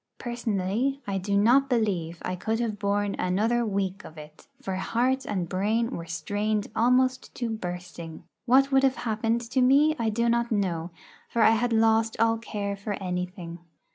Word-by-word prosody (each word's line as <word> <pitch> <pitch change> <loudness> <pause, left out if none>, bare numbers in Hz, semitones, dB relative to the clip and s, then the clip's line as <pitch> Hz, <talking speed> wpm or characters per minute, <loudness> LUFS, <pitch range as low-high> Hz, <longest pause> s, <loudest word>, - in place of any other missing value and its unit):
Personally, 240 +2 -1
I 195 -1 -2
do 200 +2 0
not 250 +6 +4
believe 190 -9 0
I 185 - -2
could 220 +5 -2
have 220 -4 -2
borne 205 0 0
another 215 +7 +1
week 195 -2 -2
of 155 - -12
it, 150 - -13
for 195 -8 -4
heart 245 +8 0
and 185 -4 -2
brain 215 +6 0
were 170 -8 -6
strained 205 +5 -2
almost 255 +2 +2
to 240 -2 -3
bursting. 175 -5 -6 0.2
What 270 +3 +5
would 270 0 +5
have 270 0 +3
happened 225 +1 0
to 240 +2 -1
me 285 +5 +5
I 225 -1 +1
do 235 +2 0
not 235 0 +1
know, 180 -6 -1 0.4
for 230 - +2
I - - +7
had 240 +2 +1
lost 225 0 +2
all 225 0 +3
care 205 -3 -4
for 200 +1 -4
anything. 180 -2 -5
215 Hz, 170 wpm, -26 LUFS, 190-235 Hz, 0.4 s, I